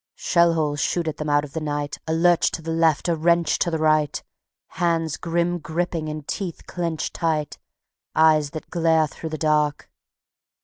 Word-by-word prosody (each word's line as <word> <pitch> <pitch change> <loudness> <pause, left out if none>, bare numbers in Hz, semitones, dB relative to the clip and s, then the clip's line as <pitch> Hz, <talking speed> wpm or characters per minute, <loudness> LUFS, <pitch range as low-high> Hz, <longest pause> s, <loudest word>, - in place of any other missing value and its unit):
Shell 170 -1 +3
holes 150 -2 0
shoot 170 +4 0
at 155 - -3
them 150 0 -3
out 145 0 +3
of 145 - -9
the 160 - -3
night; 145 -1 -3
A 160 - 0
lurch 175 +1 +4
to 165 - -5
the 165 - -3
left, 165 -1 +2
a 170 - +2
wrench 170 0 +2
to - - +1
the 165 - -1
right, 155 -2 +1 0.5
Hands 165 -3 0
grim 175 +1 -1
gripping 165 0 -3
and 150 -1 -6
teeth 185 -5 -5
clenched 170 -3 -3
tight, 155 -3 -1 0.6
Eyes 155 -2 +4
that 155 +1 -9
glare 165 -2 +3
through 160 +2 -7
the 155 - -4
dark. 150 -1 0
160 Hz, 180 wpm, -23 LUFS, 150-170 Hz, 0.6 s, lurch